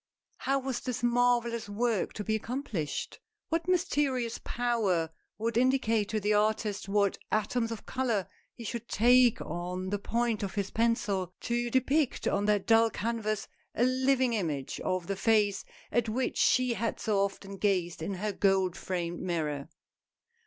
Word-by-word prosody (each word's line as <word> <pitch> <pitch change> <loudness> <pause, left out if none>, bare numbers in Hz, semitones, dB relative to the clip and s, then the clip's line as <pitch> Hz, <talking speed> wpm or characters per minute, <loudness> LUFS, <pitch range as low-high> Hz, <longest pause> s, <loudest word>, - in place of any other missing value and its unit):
How 275 +1 0
was 265 -2 -2
this 250 -2 -4
marvellous 240 -2 +2
work 220 0 0
to 210 - -4
be 220 - -1
accomplished? 220 - -3 0.3
What 330 +1 -1
mysterious 290 -10 +1
power 210 -9 0 0.3
would 225 +1 -1
indicate 235 -5 +2
to 215 - 0
the 210 +1 +1
artist 210 -1 0
what 200 -1 +2
atoms 225 +2 0
of 225 - -6
color 235 -7 -1 0.3
he 235 - -9
should 235 +1 -5
take 245 +1 +5
on 180 +3 -4
the 205 - 0
point 230 +1 0
of 200 -1 -4
his 200 -1 -2
pencil, 210 -6 0
to 240 0 -1
depict 265 +3 +1
on 200 +1 +1
that 205 -2 +2
dull 225 0 +5
canvas, 215 -1 -2 0.3
a 235 - +2
living 260 0 +2
image 155 -10 -2
of 185 -1 -1
the 195 - -2
face 205 0 +2 0.3
at 235 -2 +1
which 250 +4 -1
she 255 -1 +4
had 230 0 -2
so 210 -2 +1
often 195 0 -2
gazed 180 -5 0
in 190 +5 -3
her 210 +3 -2
gold 190 -2 +2
framed 175 -2 -3
mirror. 155 -5 -2
220 Hz, 155 wpm, -30 LUFS, 195-240 Hz, 0.3 s, take